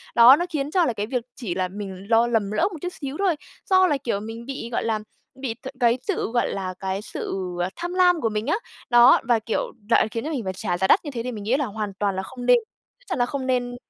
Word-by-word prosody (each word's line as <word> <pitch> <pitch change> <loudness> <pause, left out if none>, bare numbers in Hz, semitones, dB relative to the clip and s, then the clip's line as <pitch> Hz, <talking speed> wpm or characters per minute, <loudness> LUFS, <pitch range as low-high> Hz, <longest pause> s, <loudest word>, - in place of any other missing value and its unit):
Đó, 240 +3 +9
nó 345 +4 -1
khiến 295 -3 -2
cho 360 -1 +3
là 245 - 0
cái 205 -1 -3
việc 250 -1 -2
chỉ 205 -9 -4
là 185 0 0
mình 195 0 -7
lo 230 +1 +5
lầm 220 -4 0
lỡ 210 - 0
một 345 - -7
chút 355 - -2
xíu 275 0 -4
thôi, 380 -4 +2 0.3
do 375 -1 +6
là, 295 - +1
kiểu, 215 -5 -1
mình 225 +2 -7
bị, 265 -3 -5
gọi - - -1
là, 220 -1 0 0.4
bị 260 -4 -2
th - - -6
cái 240 -1 +4
sự, 385 - -1
gọi 240 0 +1
là, 185 -1 -3
cái 190 +1 -2
sự, 210 - -5 0.3
à, 175 - 0
tham 350 +1 -4
lam 360 -2 +4
của 225 - +1
mình 215 +2 -3
á. 310 - +3 0.3
Đó, 240 +1 +7
và, 240 -2 +4
kiểu 220 0 -1 0.3
lại 230 - +4
khiến 230 - -3
cho 305 - -3
mình 270 -7 -2
phải 190 -1 -3
trả 180 -1 -2
giá 190 - +1
đắt 345 - +4
như 290 - -4
thế 235 -3 -4
thì 250 - -3
mình 215 -4 -7
nghĩ 235 +6 +2
là 290 - 0
hoàn 210 -2 -4
toàn 200 -2 0
là 190 - -2
không 245 +5 -8
nên. - - +7 0.4
Chắc - - -27
chắn - - -2
là 245 - +4
không 265 +1 -4
nên 245 -1 0
235 Hz, 280 wpm, -24 LUFS, 210-275 Hz, 0.4 s, Đó